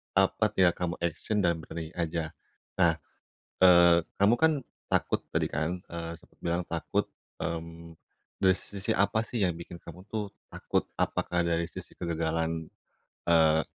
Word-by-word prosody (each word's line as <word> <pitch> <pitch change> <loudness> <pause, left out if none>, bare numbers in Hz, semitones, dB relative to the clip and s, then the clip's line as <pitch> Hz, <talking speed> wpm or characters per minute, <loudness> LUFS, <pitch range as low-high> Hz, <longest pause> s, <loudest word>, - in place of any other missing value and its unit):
apa, - - +3
tinggal 90 -2 +5
kamu 90 -1 -1
action 100 +5 0
dan 85 -1 +2
berani 80 0 -7
aja. 80 -1 -2 0.5
Nah, - - +5 0.7
eee, 85 -2 +8 0.2
kamu 100 +4 +5
kan 160 0 +6 0.4
takut - - +1
tadi - - +1
kan, 80 +5 -2
eee, 85 0 -5
sempet - - -24
bilang 85 +1 -1
takut. 85 -1 -1 0.3
Mmm, 85 0 -5 0.5
dari 95 -1 +5
sisi 100 -1 -4
apa 110 +3 +2
sih 110 -3 0
yang 90 - 0
bikin 85 0 -9
kamu 85 +2 -11
tuh 105 -2 -3 0.2
takut? - - -1
Apakah 90 -1 0
dari 85 0 0
sisi - - -9
kegagalan, 80 -1 -1 0.6
eee, 80 -1 +5
85 Hz, 145 wpm, -29 LUFS, 80-90 Hz, 0.7 s, eee